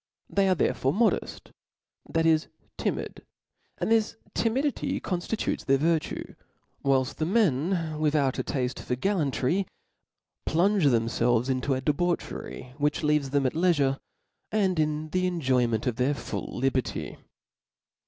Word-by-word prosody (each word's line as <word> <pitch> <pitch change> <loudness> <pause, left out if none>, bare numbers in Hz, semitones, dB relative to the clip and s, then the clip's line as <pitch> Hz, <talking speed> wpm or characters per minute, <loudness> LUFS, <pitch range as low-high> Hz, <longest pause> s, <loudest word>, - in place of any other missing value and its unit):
They 195 -1 +3
are 185 - +4
therefore 135 -2 +1
modeft, 225 +4 0 0.6
that 165 0 +1
is 160 -1 +3 0.3
timid; - - -3 0.5
and - - -1
this 225 -1 +2 0.2
timidity 265 +6 0
confticutes 180 +4 -2
their 135 0 +3
virtue: 160 +2 -1 0.5
whilft 135 -1 +1
the 155 - 0
men, 165 - +1
without 150 -3 +1
a - - 0
tafte 125 -2 -2
for 125 - -2
gallantry, 165 +1 0 0.8
jplunge 185 0 +3
themftrlve^ 120 +1 +2
into 130 +1 0
a 130 - -3
debauchery, 150 -4 -2
which 145 +1 +1
leaves 150 -2 +2
them 140 0 +1
at 130 - +1
leifure, 150 -6 +2 0.5
and 190 -5 +1
in 155 0 0
the 185 +2 +1
enjoyment 130 -10 +1
of 125 -3 -1
their 135 +3 +1
full - - -5
liberty. 130 0 -2
150 Hz, 130 wpm, -27 LUFS, 130-180 Hz, 0.8 s, are